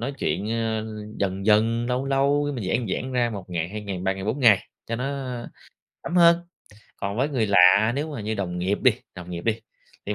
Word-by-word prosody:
nói 130 +4 -3
chuyện, 105 +3 -1
ờ, 110 -1 -1 0.3
dần 95 0 -2
dần, 115 +2 +3
lâu 125 +2 -1
lâu 140 +2 +2
mình 115 -6 -4
giãn 120 +1 0 0.2
giãn 130 0 -6
ra 120 -2 +1
1 95 -4 -8
ngày, 85 -1 -2
2 105 +2 -6
ngày, 100 -3 -4
3 95 +1 0
ngày, 95 0 -6
4 115 +7 -2
ngày 110 -6 +5 0.2
cho 115 - -3
nó, 125 - -3
ơ, 130 -4 -4 0.5
thấm 175 - -3
hơn. 170 -1 +7 0.6
Còn 100 +2 -4
với 135 +4 +1
người 125 -7 0
lạ 100 +4 +6
nếu 150 +3 -2
mà 135 - -5
như 110 +1 -2
đồng 90 -3 -3
nghiệp 95 +3 0
đi 130 -3 +6 0.2
đồng 90 -1 -9
nghiệp 85 -1 -6
đi, 115 0 0 0.5
thì 105 - -1
110 Hz, 225 wpm, -24 LUFS, 100-130 Hz, 0.6 s, hơn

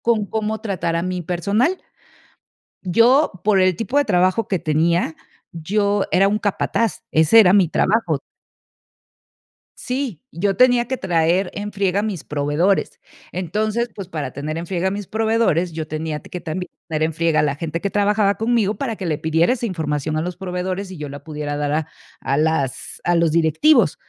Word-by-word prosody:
con 225 -3 +1
cómo 220 +1 -2
tratar 180 -5 -2
a 170 - -1
mi 185 0 -2
personal. 200 - 0 1.0
Yo, 230 - +4
por 205 -2 +4
el 185 -1 +3
tipo 230 +5 -3
de 290 - +3
trabajo 185 0 +2
que 190 - -1
tenía, 165 +1 +1 0.4
yo 200 +5 0
era 195 +2 +4
un 210 +1 0
capataz, 215 +1 -1
ese 160 +8 +6
era 185 -4 +6
mi 190 -5 +4
trabajo. 175 -7 +1 1.6
Sí, 250 - -3
yo 195 +3 -1
tenía 245 -1 +4
que 260 - -2
traer 175 +1 +1
en 205 +1 -5
friega 195 0 0
a - - -3
mis 210 -6 -4
proveedores, 150 +7 0 0.3
entonces, 215 +6 -1
pues 195 -3 -7
para 150 -5 -4
tener 155 +3 -4
en 170 - -5
friega 185 +1 -1
a - - -1
mis 200 -1 -5
proveedores, 220 -6 +1
yo 160 -1 -5
tenía 155 -1 -4
t - - -15
que 180 - -5
también 180 +3 -5 0.2
tener 155 -2 -1
en 160 0 -2
friega 165 -1 +2
a - - +2
la 145 -1 0
gente 165 +1 -4
que 200 - -2
trabajaba 205 0 +2
conmigo 220 -1 +1
para 230 -1 -3
que 190 - -5
le 155 - 0
pidiera 160 +5 +2
esa 240 -2 -3
información 155 -5 -2
a - - 0
los 175 +1 -4
proveedores 185 +1 -4
y 185 - -9
yo 150 - -5
la 140 0 -9
pudiera 150 -2 -4
dar 145 0 -1
a 155 +1 -1 0.3
a 140 - -1
las 155 -4 -1
a 175 - +2
los 170 -2 +2
directivos. 170 - +3
180 Hz, 185 wpm, -20 LUFS, 160-210 Hz, 1.6 s, ese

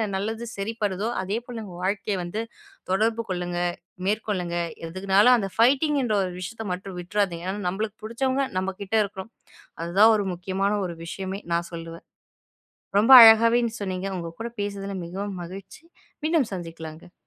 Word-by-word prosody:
நல்லது 220 +4 -3
சரிப்படுதோ! 205 -1 -2
அதேபோல 230 +4 -4
உங்க 180 -3 -10
வாழ்க்கைய 200 +1 -1
வந்து 190 +6 -3 0.5
தொடர்பு 225 +4 +1
கொள்ளுங்க. 175 -1 -2 0.5
மேற்கொள்ளுங்க. 200 -5 -1 0.3
எதுக்குன்னாலும் 195 +7 +4
அந்த 195 -3 -2
ஃபைட்டிங்கின்ற 265 0 +3
ஒரு 185 - -3
விஷயத்த 220 +5 -6
மட்டும் 185 0 -7
விட்றாதீங்க. 180 -2 -1
ஆனா 205 +1 -5
நம்மளுக்கு 205 +3 -4
புடிச்சவங்க 260 +5 0
நம்மக்கிட்ட 190 +2 -3
இருக்கணும். 195 +2 -9 0.5
அது 170 +1 -4
தான் 220 +1 +8
ஒரு 205 - -1
முக்கியமான 190 +3 -1
ஒரு 170 - -7
விஷயமே! 190 +3 -5
நான் 170 0 -1
சொல்லுவேன். 165 0 -8 1.0
ரொம்ப 230 +5 +5
அழகாக 225 +1 +8
நீங்கச் 235 -2 -3
சொன்னீங்க. 185 0 -3
உங்க 170 -1 -5
கூடப் 235 0 -6
பேசுனதுல 200 -1 -4
மிகவும் 190 +1 -5
மகிழ்ச்சி. 190 - -10 0.4
மீண்டும் 310 -7 +2
சந்திக்கலாங்க. 165 -1 -8
195 Hz, 140 wpm, -25 LUFS, 180-225 Hz, 1.0 s, தான்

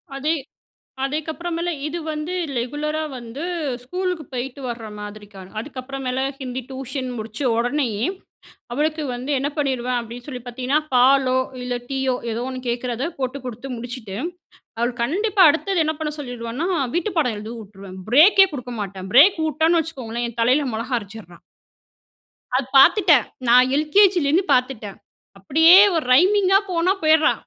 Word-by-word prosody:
அதே 300 +4 0 0.7
அதேக்கப்புறமேல 330 +4 -3 0.2
இது 340 +3 -4
வந்து 305 +4 -4 0.2
ரெகுலரா 295 +6 -2 0.2
வந்து 240 +5 -8 0.4
ஸ்கூலுக்கு 360 +3 -3
போயிட்டு 255 +2 -5
வர 230 -2 -5
மாதிரிக்க. 210 0 -10 0.2
அதுக்கப்புறமேல 260 0 -5 0.2
ஹிந்தி 255 -1 -5
டியூஷன் 265 0 -5
முடிச்ச 220 0 -7 0.2
உடனேயே 245 -3 0 0.7
அவளுக்கு 305 +4 -1
வந்து 250 +4 -4
என்ன 275 +2 -1
பண்ணிடுவேன் 255 -4 -1
அப்டின்னு 240 +1 -9
சொல்லி 255 -4 -6
பார்த்தீங்கன்னா, 255 +4 -1
பாலோ 255 +1 +4 0.2
இல்ல 250 0 -3
டீயோ 265 -2 0 0.2
ஏதோ 225 +2 -3
ஒண்ணு 255 -1 -5
கேட்கிறத 245 +3 -2
போட்டு 260 0 -3
குடுத்து 250 +2 -7
முடிச்சுட்டு, 230 -4 -7 0.6
அவள்க்கு 240 +1 -1
கண்டிப்பா 395 - +1
அடுத்தது 345 +3 0
என்ன 315 0 -1
பண்ண 300 -1 -2
சொல்லிடுவனா 245 +2 -4 0.3
வீட்டு 350 +4 -1
பாடம் 250 -8 +1
எழுத 215 +2 -7
வுட்ருவேன். 195 -3 -11
பிரேக் 325 - +6
எ - - -13
குடுக்க 250 -2 -6
மாட்டேன். 195 -1 -6
பிரேக் 340 +9 +7
வுட்டேன்னு 320 +3 +2
வச்சுக்கோங்களேன் 240 -7 -4
என் 235 - -12
தலையில 260 +4 +2
மொளகா 240 +3 -2
அரச்சிட்றா. 200 -5 -12 1.2
அது 260 +1 +1
பார்த்துட்டேன். 305 - +5 0.2
நான் 250 +2 +6
எல்கேஜிலேருந்து 345 +1 +3
பார்த்துட்டேன். 250 -6 -1 0.4
அப்டியே 320 - +6 0.2
ஒரு 320 - 0
ரைமிங் 380 +6 +4
அ - - +3
போனா 355 +2 +2
போயிட்றா 315 0 +5
260 Hz, 140 wpm, -22 LUFS, 240-310 Hz, 1.2 s, பிரேக்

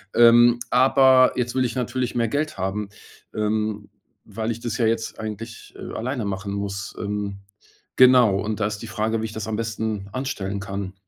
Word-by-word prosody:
Ähm, 120 +1 +6
aber 130 0 +5
jetzt 120 -1 -2
will 130 - +2
ich 120 - -3
natürlich 125 0 -2
mehr 115 -1 +1
Geld 155 +2 -2
haben. 95 +2 -3 0.5
Ähm, 105 -1 -1 0.4
weil 110 0 -2
ich 115 - -5
das 115 -2 -3
ja 115 - +1
jetzt 115 0 -2
eigentlich, 110 +1 -7
äh, - - -8
alleine 125 +1 -3
machen 100 0 -4
muss. 100 -1 -4
Ähm, 100 -1 -4 0.6
genau. 125 -6 +6
Und 110 +1 -3
da 105 - +2
ist 105 0 -4
die - - -8
Frage, 110 0 -1
wie - - -2
ich 110 - -6
das 110 -1 -5
am 110 - -2
besten 110 -3 -3
anstellen 100 -7 -3
kann? 100 -1 -5
110 Hz, 185 wpm, -23 LUFS, 105-120 Hz, 0.6 s, Ähm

